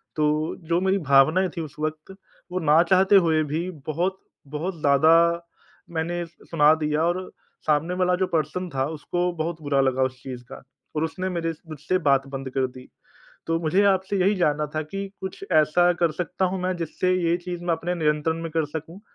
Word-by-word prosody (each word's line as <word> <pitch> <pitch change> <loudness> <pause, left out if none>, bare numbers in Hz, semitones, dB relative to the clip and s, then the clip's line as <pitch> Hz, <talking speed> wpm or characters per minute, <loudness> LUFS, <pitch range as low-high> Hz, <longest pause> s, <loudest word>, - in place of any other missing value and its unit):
तो 155 +1 0
जो 170 +1 +2
मेरी 190 +1 +2
भावनाएँ 155 +8 +5
थी - - -1
उस 155 -4 -8
वक़्त, 155 +4 -4 0.4
वो 185 - -1
ना 155 -1 +5
चाहते 190 +3 +4
हुए 165 -5 +4
भी 165 +5 -2 0.2
बहुत 175 +5 -1 0.4
बहुत 170 +3 -3
ज़्यादा 145 +2 +4 0.8
मैंने 170 +2 -2
स - - -17 0.2
सुना 150 -2 +5
दिया 155 0 0
और 175 +2 +1 0.5
सामने 155 +4 +2
वाला 180 0 +2
जो 185 +1 0
पर्सन 165 +3 -1
था 135 -3 -1
उसको 175 +4 -1
बहुत 165 0 -4
बुरा 145 -2 +1
लगा 130 -1 +2
उस 130 0 -3
चीज़ 125 -2 -7
का, 125 - -11 0.3
और 155 - 0
उसने 185 +3 -3
मेरे 165 -2 -2 0.2
मुझसे 155 +4 -1
बात 135 0 +3
बंद 135 -1 -5
कर 130 0 0
दी। 130 0 -13 0.6
तो 165 0 +1
मुझे 170 +5 +2
आपसे 190 0 +1
यही 195 +3 +3
जानना 150 -4 +1
था 155 - 0
कि 195 +6 -5
कुछ 190 +1 -6
ऐसा 160 +3 +4
कर 170 -2 +3
सकता 180 +3 -2
हूँ 190 - -2
मैं 185 0 -1
जिससे 175 +2 -1
ये 170 -2 +1
चीज़ 175 -1 -5
मैं 175 - +1
अपने 170 +2 -3
नियंत्रण 155 -1 0
में 165 - -4
कर 160 0 +1
सकूँ? 160 +5 -7
165 Hz, 195 wpm, -24 LUFS, 150-180 Hz, 0.8 s, भावनाएँ